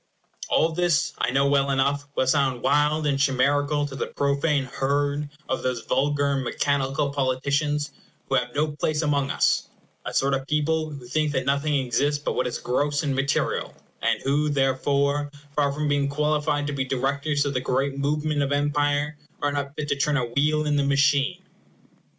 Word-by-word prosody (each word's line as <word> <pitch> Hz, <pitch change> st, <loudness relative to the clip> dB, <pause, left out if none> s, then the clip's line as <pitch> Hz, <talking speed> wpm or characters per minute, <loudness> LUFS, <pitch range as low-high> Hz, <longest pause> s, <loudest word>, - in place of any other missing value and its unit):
All 165 Hz, -, +3 dB
this, 170 Hz, -3 st, +1 dB
I -, -, +1 dB
know 135 Hz, +2 st, +2 dB
well 140 Hz, 0 st, +2 dB
enough, 140 Hz, +1 st, +1 dB
will -, -, +2 dB
sound 130 Hz, -2 st, +1 dB
wild 150 Hz, +2 st, +2 dB
and 140 Hz, -2 st, +1 dB
chimerical 145 Hz, +2 st, +2 dB
to 140 Hz, -2 st, -7 dB
the -, -, -3 dB
profane 140 Hz, +1 st, 0 dB
herd 145 Hz, +3 st, -1 dB, 0.2 s
of -, -, -1 dB
those 125 Hz, -2 st, -2 dB
vulgar 145 Hz, +2 st, +1 dB
and 135 Hz, -1 st, 0 dB
mechanical 140 Hz, +2 st, 0 dB
politicians 140 Hz, +2 st, 0 dB, 0.4 s
who -, -, -3 dB
have 125 Hz, -2 st, 0 dB
no 150 Hz, +1 st, +1 dB
place 150 Hz, +1 st, -1 dB
among 140 Hz, -2 st, +1 dB
us; -, -, +1 dB, 0.4 s
a -, -, -4 dB
sort 135 Hz, +1 st, +1 dB
of 135 Hz, 0 st, -2 dB
people 155 Hz, +1 st, 0 dB
who 140 Hz, -4 st, -9 dB
think 150 Hz, +4 st, 0 dB
that 130 Hz, -2 st, -1 dB
nothing 140 Hz, +2 st, +1 dB
exists 135 Hz, +2 st, +1 dB
but 145 Hz, -, -3 dB
what -, -, 0 dB
is 120 Hz, -, -3 dB
gross 145 Hz, +4 st, 0 dB
and 140 Hz, -2 st, 0 dB
material, 135 Hz, +2 st, -1 dB, 0.3 s
and -, -, +1 dB
who, 145 Hz, +2 st, +1 dB
therefore, 140 Hz, +1 st, +1 dB, 0.3 s
far 145 Hz, -1 st, +2 dB
from 150 Hz, +2 st, -2 dB
being 145 Hz, -1 st, +1 dB
qualified 150 Hz, 0 st, 0 dB
to 145 Hz, -, -3 dB
be 135 Hz, -1 st, -1 dB
directors 140 Hz, +3 st, 0 dB
of 140 Hz, -, -1 dB
the 125 Hz, -, -1 dB
great 135 Hz, +2 st, 0 dB
movement 150 Hz, +1 st, 0 dB
of 140 Hz, 0 st, -1 dB
empire, 145 Hz, +1 st, 0 dB, 0.2 s
are 145 Hz, -, 0 dB
not 140 Hz, 0 st, -3 dB
fit 150 Hz, -, -4 dB
to -, -, +2 dB
turn 150 Hz, +1 st, +1 dB
a 125 Hz, -, 0 dB
wheel 150 Hz, +5 st, +1 dB
in 150 Hz, -1 st, +1 dB
the 140 Hz, -, +2 dB
machine. 140 Hz, +5 st, +2 dB
145 Hz, 185 wpm, -25 LUFS, 135-150 Hz, 0.4 s, All